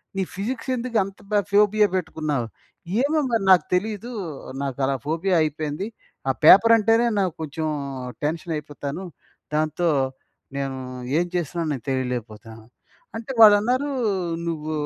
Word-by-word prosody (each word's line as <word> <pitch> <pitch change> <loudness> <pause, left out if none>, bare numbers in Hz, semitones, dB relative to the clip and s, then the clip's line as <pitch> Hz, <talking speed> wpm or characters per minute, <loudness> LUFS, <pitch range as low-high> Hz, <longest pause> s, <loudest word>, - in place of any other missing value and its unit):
నీ 195 - 0
ఫిజిక్స్ 230 +6 -4
ఎందుకు 240 -1 -2
అంత 195 0 -10
బా 205 - +4
ఫోబియా 210 +1 +4
పెట్టుకున్నావు?" 155 -8 -2 0.5
ఏమో 300 +3 +2
మరి 225 -4 +1
నాకు 180 -5 +6
తెలీదు. 215 +5 -2 0.5
నాకలా 135 0 -1
ఫోబియా 170 +5 0
అయిపోయింది. 155 +5 -3 0.4
ఆ - - +5
పేపర్ 230 +7 +8
అంటేనే 225 +2 +3
నాకు 185 -4 0
కొంచెం 155 +1 -3 0.6
టెన్షనయిపోతాను. 150 +1 -4 0.5
దాంతో, 155 +2 +1 0.7
నేను 135 -1 -3 0.4
ఏం 175 - +1
చేస్తున్నానో 170 -1 -2
నేను 130 - -7
తెలియలేకపోతున్నాను. 115 -4 -4 0.5
అంటే 230 +3 -6
వాళ్ళన్నారు, 225 +6 +6 0.6
"నువ్వు 155 -2 -3
170 Hz, 115 wpm, -23 LUFS, 145-210 Hz, 0.7 s, పేపర్